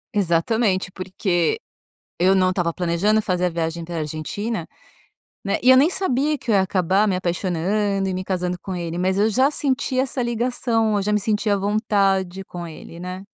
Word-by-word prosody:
Exatamente, 190 Hz, +1 st, +1 dB
porque 185 Hz, -, -1 dB, 0.6 s
eu 185 Hz, +2 st, +4 dB
não 185 Hz, -1 st, +3 dB
estava 175 Hz, -3 st, -1 dB
planejando 185 Hz, +5 st, +1 dB
fazer 180 Hz, -2 st, 0 dB
a -, -, +2 dB
viagem 165 Hz, 0 st, -3 dB
para 170 Hz, 0 st, -6 dB
a -, -, -1 dB
Argentina, 160 Hz, +6 st, -4 dB, 0.8 s
né. 200 Hz, -, 0 dB
E 255 Hz, -, +4 dB
eu 260 Hz, -, +9 dB
nem 280 Hz, +5 st, +5 dB
sabia 300 Hz, -5 st, 0 dB
que 240 Hz, -, -10 dB
eu 210 Hz, -, +4 dB
ia 190 Hz, -, +5 dB
acabar 190 Hz, +2 st, +2 dB
me 185 Hz, -, +1 dB
apaixonando 195 Hz, +3 st, -1 dB
e 190 Hz, -, -1 dB
me 185 Hz, 0 st, -3 dB
casando 180 Hz, -1 st, -2 dB
com 190 Hz, -, -5 dB
ele. 170 Hz, -1 st, -4 dB
Mas 185 Hz, +2 st, 0 dB
eu 215 Hz, +2 st, +3 dB
já 260 Hz, +6 st, +3 dB
senti 270 Hz, -2 st, 0 dB
essa 260 Hz, -1 st, -1 dB
ligação. 235 Hz, -2 st, 0 dB
Eu 205 Hz, -, +1 dB
já 210 Hz, +2 st, -1 dB
me 210 Hz, -, +2 dB
sentia 210 Hz, 0 st, +1 dB
à -, -, -1 dB
vontade 195 Hz, -2 st, 0 dB
com 175 Hz, -1 st, -7 dB
ele, 165 Hz, +1 st, -11 dB
né. 185 Hz, +1 st, -6 dB
195 Hz, 195 wpm, -22 LUFS, 180-220 Hz, 0.8 s, eu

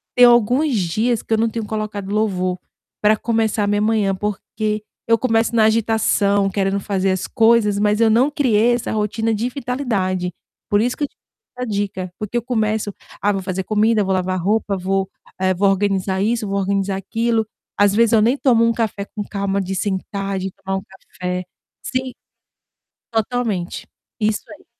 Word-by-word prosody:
tem 250 Hz, -, +6 dB
alguns 245 Hz, +5 st, +5 dB
dias 215 Hz, +6 st, 0 dB
que -, -, -3 dB
eu 220 Hz, -, +3 dB
não 230 Hz, +1 st, +2 dB
tenho 225 Hz, -1 st, -4 dB
colocado 210 Hz, -2 st, -4 dB
louvor 185 Hz, -4 st, 0 dB, 0.4 s
para 215 Hz, +1 st, +4 dB
começar 220 Hz, -2 st, 0 dB
a -, -, -2 dB
minha 205 Hz, 0 st, +1 dB
manhã, 210 Hz, -3 st, +2 dB
porque 210 Hz, +1 st, -3 dB, 0.2 s
eu 230 Hz, 0 st, +4 dB
começo 225 Hz, -1 st, +1 dB
na 220 Hz, -2 st, +4 dB
agitação 215 Hz, -3 st, +2 dB
querendo 195 Hz, 0 st, 0 dB
fazer 195 Hz, -1 st, 0 dB
as 185 Hz, -1 st, -2 dB
coisas, 225 Hz, -3 st, +3 dB
mas 210 Hz, +1 st, +2 dB
eu 230 Hz, -1 st, +5 dB
não 250 Hz, +7 st, +3 dB
criei 240 Hz, -4 st, +3 dB
essa 240 Hz, -2 st, -2 dB
rotina 220 Hz, +1 st, 0 dB
de 230 Hz, +4 st, -1 dB
vitalidade. 220 Hz, -9 st, -2 dB, 0.4 s
Por 205 Hz, -, +3 dB
isso 245 Hz, +2 st, 0 dB
que 295 Hz, -, 0 dB, 0.5 s
valeu 250 Hz, 0 st, -4 dB
a -, -, -3 dB
dica, 195 Hz, -3 st, -2 dB
porque 215 Hz, +2 st, -6 dB
eu -, -, +1 dB
começo: 220 Hz, -3 st, -1 dB, 0.3 s
"Ah, 205 Hz, -, +3 dB
vou 195 Hz, -, -2 dB
fazer 185 Hz, 0 st, -2 dB
comida, 215 Hz, +1 st, +2 dB
vou 195 Hz, -, -1 dB
lavar 185 Hz, 0 st, 0 dB
roupa, 205 Hz, +2 st, +1 dB
vou, 190 Hz, +1 st, 0 dB, 0.3 s
eh, 185 Hz, 0 st, +2 dB
vou 195 Hz, +2 st, +2 dB
organizar 195 Hz, -1 st, 0 dB
isso, 225 Hz, +1 st, 0 dB
vou 200 Hz, 0 st, -1 dB
organizar 195 Hz, 0 st, 0 dB
aquilo", 225 Hz, +3 st, 0 dB, 0.3 s
às 205 Hz, -1 st, +5 dB
vezes 230 Hz, +1 st, +3 dB
eu 220 Hz, -, +5 dB
nem 235 Hz, +5 st, +3 dB
tomo 240 Hz, -5 st, +3 dB
um 230 Hz, -, +2 dB
café 220 Hz, -3 st, -2 dB
com 205 Hz, 0 st, -6 dB
calma 200 Hz, -1 st, -2 dB
de 190 Hz, 0 st, -3 dB
sentar, 195 Hz, 0 st, -2 dB
de 190 Hz, +1 st, -3 dB
tomar 190 Hz, +1 st, -4 dB
um 190 Hz, -, -6 dB
café 180 Hz, -2 st, -6 dB, 0.4 s
sim, 255 Hz, +2 st, -2 dB, 1.0 s
totalmente, 225 Hz, -5 st, -2 dB, 0.3 s
isso 215 Hz, 0 st, +1 dB
aí. -, -, -14 dB
210 Hz, 180 wpm, -20 LUFS, 195-225 Hz, 1.0 s, tem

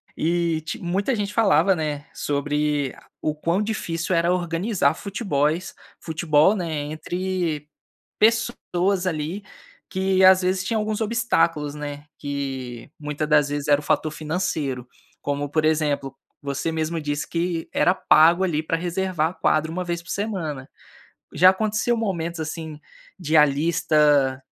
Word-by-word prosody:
E 170 Hz, 0 st, 0 dB
te 155 Hz, -1 st, -6 dB
muita 190 Hz, +8 st, -1 dB
gente 205 Hz, -1 st, -3 dB
falava, 195 Hz, -4 st, +4 dB
né, 150 Hz, -3 st, -3 dB
sobre 145 Hz, -1 st, -1 dB, 0.3 s
o 155 Hz, -, -1 dB
quão 170 Hz, +5 st, 0 dB
difícil 185 Hz, -5 st, -2 dB
era 170 Hz, +1 st, +3 dB
organizar 175 Hz, -2 st, +1 dB
futebóis 175 Hz, -, -1 dB, 0.2 s
futebol, 160 Hz, +3 st, +2 dB
né, 180 Hz, -4 st, -2 dB
entre 155 Hz, +1 st, -3 dB, 0.5 s
pessoas 200 Hz, -4 st, +1 dB
ali 165 Hz, +4 st, -3 dB, 0.5 s
que, 190 Hz, -1 st, +1 dB
às 190 Hz, 0 st, +7 dB
vezes, 185 Hz, 0 st, +1 dB
tinham 220 Hz, +3 st, 0 dB
alguns 215 Hz, +1 st, -2 dB
obstáculos, 205 Hz, -10 st, +1 dB
né, 145 Hz, -1 st, -6 dB
que 135 Hz, -4 st, -5 dB
muita 150 Hz, 0 st, -3 dB
das 150 Hz, -2 st, +4 dB
vezes 145 Hz, 0 st, -3 dB
era 145 Hz, -1 st, +4 dB
o -, -, -15 dB
fator 155 Hz, +1 st, +1 dB
financeiro, 150 Hz, -5 st, -3 dB, 0.3 s
como 145 Hz, 0 st, -2 dB
por 155 Hz, +1 st, +1 dB
exemplo, 145 Hz, -3 st, 0 dB, 0.3 s
você 140 Hz, +3 st, -2 dB
mesmo 160 Hz, +1 st, -2 dB
disse, 145 Hz, 0 st, -3 dB
que 170 Hz, -1 st, -2 dB
era 180 Hz, -, +3 dB
pago 170 Hz, 0 st, +5 dB
ali 155 Hz, -4 st, -1 dB
pra 165 Hz, +1 st, -1 dB
reservar 175 Hz, -1 st, -1 dB
a -, -, -13 dB
quadra 155 Hz, -3 st, +1 dB
1 180 Hz, +2 st, -3 dB
vez 170 Hz, -1 st, -3 dB
por 180 Hz, -, -16 dB
semana. 170 Hz, -10 st, -3 dB, 0.7 s
Já 185 Hz, +5 st, +7 dB
aconteceu 215 Hz, +4 st, 0 dB
momentos, 170 Hz, -6 st, -2 dB
assim, 160 Hz, -1 st, -5 dB, 0.4 s
de 160 Hz, -3 st, +1 dB
a 150 Hz, -, +8 dB
lista 150 Hz, -2 st, +2 dB
160 Hz, 140 wpm, -23 LUFS, 150-185 Hz, 0.7 s, a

